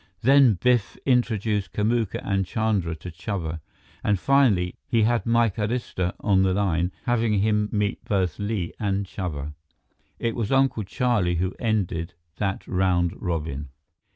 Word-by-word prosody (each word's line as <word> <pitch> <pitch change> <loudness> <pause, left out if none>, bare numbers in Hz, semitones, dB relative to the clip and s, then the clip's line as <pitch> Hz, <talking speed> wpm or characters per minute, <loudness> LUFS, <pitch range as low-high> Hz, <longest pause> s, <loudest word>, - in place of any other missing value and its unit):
Then 135 -3 +6
Biff 120 +3 +1
introduced 110 -5 +1
Kamuka 110 0 0
and 100 -1 0
Chandra 100 -4 -1
to 85 +3 -9
Chuba; 80 -2 -4 0.4
and 105 - +2
finally, 110 -11 +3
he 115 -2 +2
had 120 +1 +1
Mike 115 -3 +2
Arista 105 -5 -2
on 95 -2 +3
the 95 -1 +2
line, 90 -3 +1
having 115 -3 +2
him 105 0 +1
meet 105 -1 -1
both 95 -5 0
Li 100 -4 -2
and 100 -1 0
Chuba. 75 -7 -5 0.6
It 115 -1 -2
was 115 -2 -2
Uncle 135 -5 +2
Charlie 100 -5 +1
who 90 +2 -1
ended 95 -8 -1 0.2
that 100 -2 -2
round 90 -2 +1
robin. 75 -5 -3
100 Hz, 140 wpm, -25 LUFS, 90-115 Hz, 0.6 s, Then